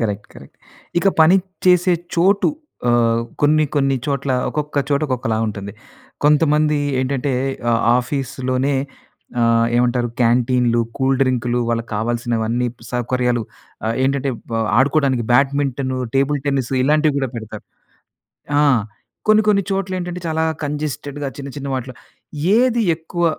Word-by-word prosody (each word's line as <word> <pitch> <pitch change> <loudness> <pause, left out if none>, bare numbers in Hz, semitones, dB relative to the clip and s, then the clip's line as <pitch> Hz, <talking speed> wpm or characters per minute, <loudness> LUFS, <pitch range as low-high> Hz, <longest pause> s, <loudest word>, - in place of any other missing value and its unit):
Correct 105 -2 -2
correct. - - -14 0.4
ఇక 195 - +3
పని 170 +4 +6 0.3
చేసే 180 0 +5 0.2
చోటు 195 +4 +3 0.4
ఆహ్, 115 -1 +3 0.2
కొన్ని, 155 +1 +4
కొన్ని 135 -2 +2
చోట్ల 140 -1 -1 0.2
ఒకొక్క 150 -1 -4
చోట 140 -1 +1
ఒకొక్కలా 125 -4 -1
ఉంటుంది. 100 -1 -5 0.5
కొంతమంది 150 0 +3 0.2
ఏంటంటే 135 +1 -1 0.4
ఆహ్, 115 0 +2 0.2
ఆఫీస్‌లోనే 130 +1 -1 0.7
ఆహ్, 115 0 +3
ఏమంటారు 120 0 +1
క్యాంటీన్‌లు, 120 0 +2 0.2
కూల్ 135 0 +2
డ్రింక్‌లు 125 -2 +1
వాళ్ళకి 115 0 -2
కావాల్సినవన్నీ 120 +1 -1 0.3
సౌకర్యాలు, 125 0 0 0.4
ఆహ్, 115 - 0
ఏంటంటే 135 0 0 0.2
వ్ - - 0 0.2
ఆడుకోవడానికి 135 -3 +2
బ్యాడ్మింటను, 135 -1 +1 0.2
టేబుల్ 140 +1 +1
టెన్నిసు 135 -2 0
ఇలాంటివి 150 +2 +3
కూడా 135 -1 -1
పెడతారు. 110 -2 -8 1.0
ఆ! - - +4 0.7
కొన్ని, 215 0 +6
కొన్ని 200 -1 +4
చోట్ల 195 -1 -1
ఏంటంటే 175 0 -5
చాలా 160 0 0 0.2
కంజెస్టెడ్‌గా 145 -1 -4
చిన్న 140 0 -6
చిన్న 140 0 -5
వాటిలో, 130 0 -5 0.6
ఏది 240 -1 +3
ఎక్కువ 170 +2 -3
135 Hz, 125 wpm, -19 LUFS, 120-150 Hz, 1.0 s, పని